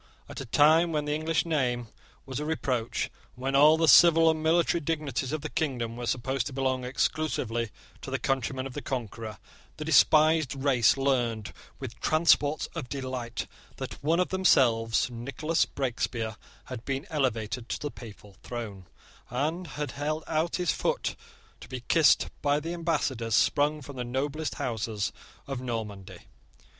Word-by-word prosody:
At - - -7
a - - -6
time 160 +6 +5
when 150 -2 -1
the 150 - -1
English 155 +2 0
name 125 -7 0 0.4
was 135 0 -4
a - - -3
reproach, 130 -7 -1 0.2
and 125 - -12
when 135 +1 0
all 150 +3 +7
the 165 0 +2
civil 165 +3 +7
and 160 -1 -3
military 170 +1 +2
dignities 145 -4 -2
of 155 -1 -2
the - - -4
kingdom 120 -7 -2
were 120 0 -5
supposed 130 0 -1
to 140 - -7
belong 130 -1 0
exclusively 125 -3 -1 0.3
to - - -7
the - - -1
countrymen 135 0 -1
of 135 - -6
the - - -5
Conqueror, 115 -4 -5 0.4
the 155 - -5
despised 155 -1 +4
race 135 -3 +3
learned, 120 -6 0 0.2
with - - -8
transports 155 -2 +3
of 145 -7 -5
delight, 130 -3 -4 0.3
that - - -7
one 165 +4 +2
of 180 - +1
themselves, 120 -12 +3
Nicholas 135 +7 -1
Breakspear, 120 -4 -2 0.3
had 125 -3 -8
been 135 +2 -3
elevated 115 -5 -1
to - - -2
the 145 - -4
papal 105 -4 -12
throne, 105 -7 -7 0.4
and 155 +8 -2
had 150 0 -4
held 155 +2 -3
out 160 +2 0
his 180 - +1
foot 485 +1 -1 0.4
to - - -12
be 130 -2 -5
kissed 160 -3 +4
by 145 0 +2
ambassadors 150 -8 -1
sprung 150 +1 +2
from 140 0 -9
the 125 - -2
noblest 140 +5 -2
houses 110 -3 -2 0.3
of 135 -2 -4
Normandy. 110 -6 -5
135 Hz, 160 wpm, -28 LUFS, 120-155 Hz, 0.4 s, all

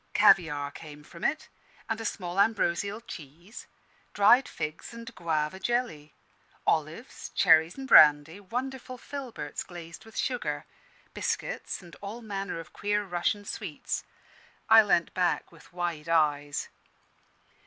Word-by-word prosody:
Caviare 155 -8 +4
came 150 -1 -11
from 170 +2 -13
it, 310 +2 0 0.4
and 225 0 -2
a - - -5
small 180 -3 -3
ambrosial 200 0 +1
cheese; 170 - -11 0.5
dried 240 +6 +6
figs 155 +8 -6
and 230 0 -9
guava 160 0 -1
jelly; 190 - -2 0.5
olives, 160 - -2
cherries 160 +4 +5
in 270 - -6
brandy, 150 - +7
wonderful 255 +4 -5
filberts 255 - -6
glazed 170 -2 -10
with 225 - -13
sugar; 150 - -2 0.5
biscuits - - -3
and 170 -2 -13
all 215 +4 -7
manner 200 -4 -4
of 160 -2 -11
queer 205 0 0
Russian 195 +3 -1
sweets. - - -4 0.6
I 220 0 +9
leant 185 -5 +1
back 180 -2 0
with 165 -2 -18
wide 170 -3 -3
eyes. 145 -3 +1
180 Hz, 125 wpm, -28 LUFS, 155-225 Hz, 0.6 s, I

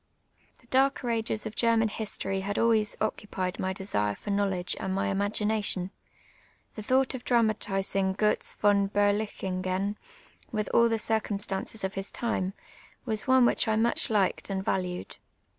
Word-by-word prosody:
The - - -22
darker 265 +1 +2
a«^es 225 -1 -1
of 220 - -5
Gennan 230 -1 +3
history 195 -3 -3
had 200 +1 -3
always 220 -2 +2
occupied 195 -3 -3
my 190 - -1
desire 105 - -1
for 205 - -6
knowledge 195 -3 0
and 190 0 -2
my 195 0 0
imai^ination. 205 -2 0 0.8
Tlie 215 - -6
thoui; 260 +4 +3
ht - - -4
of 255 -2 -6
dramati/in«; 195 -4 +1
Gvtz 210 +1 0
von 200 -1 +3
BerUchinifcn, 200 -1 -1 0.5
with 215 -2 -2
all 235 0 +5
the 225 - +1
circum 220 -2 +1
stances 195 +2 -3
of 190 +1 -2
his 195 0 -3
time, 195 -5 -2 0.5
was 220 -1 -1
one 260 -1 +6
which - - +3
I 220 - +2
much 230 +2 +3
liked 205 -3 +1
and 190 -1 -3
valued. 180 -1 -2
205 Hz, 155 wpm, -28 LUFS, 190-220 Hz, 0.8 s, one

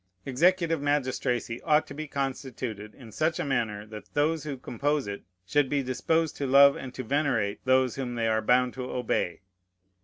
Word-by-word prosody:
Executive 165 +3 +2
magistracy 130 -4 -1
ought 150 +1 +3
to - - -10
be 155 +1 -6
constituted 130 -6 -4
in 120 -5 -13
such 155 +7 0
a - - -1
manner 110 -6 -1
that 105 0 -10
those 155 +2 +1
who 140 -3 -4
compose 140 +3 -1
it 100 0 -5 0.2
should 140 +7 +2
be 140 -1 0
disposed 160 +5 0
to 140 - -2
love 140 +1 +7
and 130 - -7
to 130 - -4
venerate 125 -6 0
those 130 -1 +3
whom 125 -3 -3
they 115 -1 0
are 110 0 +2
bound 125 +2 +3
to 130 -1 -5
obey. 90 -8 -1
130 Hz, 180 wpm, -27 LUFS, 120-145 Hz, 0.2 s, love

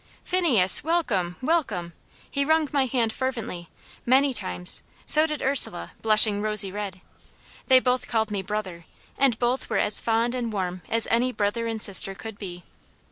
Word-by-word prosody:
"Phineas, 275 - +3
welcome, 230 - -1
welcome!" 225 - -1 0.3
He 280 - -2
wrung 315 +1 +1
my 275 -2 +1
hand 230 -3 -1
fervently, 230 -10 -5 0.3
many 265 +2 +2
times; 90 - -3 0.2
so 310 +1 +3
did 300 -2 -5
Ursula, 260 - +3
blushing 215 -1 +3
rosy 210 -2 +3
red. 195 -2 -6 0.7
They 260 -1 +6
both 255 0 -1
called 220 -2 -1
me 200 -2 -2
"brother," 190 -4 -6 0.3
and 265 -4 +1
both 245 +2 -2
were 220 - -1
as 210 - +2
fond 230 +1 0
and 240 -3 -4
warm 185 -3 -4
as 230 0 +1
any 245 +2 +1
brother 230 +1 -2
and 225 -1 -4
sister 195 -1 +4
could 220 0 -10
be. 180 -3 -9
225 Hz, 160 wpm, -24 LUFS, 195-260 Hz, 0.7 s, They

